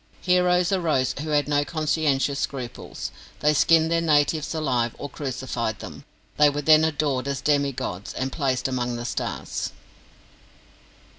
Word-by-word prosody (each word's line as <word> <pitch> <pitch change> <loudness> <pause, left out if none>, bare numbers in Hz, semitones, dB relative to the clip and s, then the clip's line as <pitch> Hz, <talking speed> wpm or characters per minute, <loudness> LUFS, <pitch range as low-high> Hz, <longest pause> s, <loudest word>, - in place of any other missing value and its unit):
Heroes 180 0 +3
arose 155 -9 +1
who 155 - -5
had 145 -1 +2
no 145 -1 +2
conscientious 150 -3 0
scruples. 125 -4 -5 0.3
They 150 0 +4
skinned 160 +2 +4
their 165 0 +2
natives 155 0 +2
alive, 125 -7 0
or 145 - -5
crucified 130 -5 -3
them. - - -10 0.3
They 150 0 +6
were 145 +1 -3
then 155 +1 +6
adored 145 -4 0
as 140 -1 -2
demi 140 0 +2
gods, 100 -6 -5
and 130 +1 -2
placed 135 -4 0
among 125 -2 -2
the 120 0 -5
stars. - - -3
145 Hz, 145 wpm, -24 LUFS, 130-155 Hz, 0.3 s, They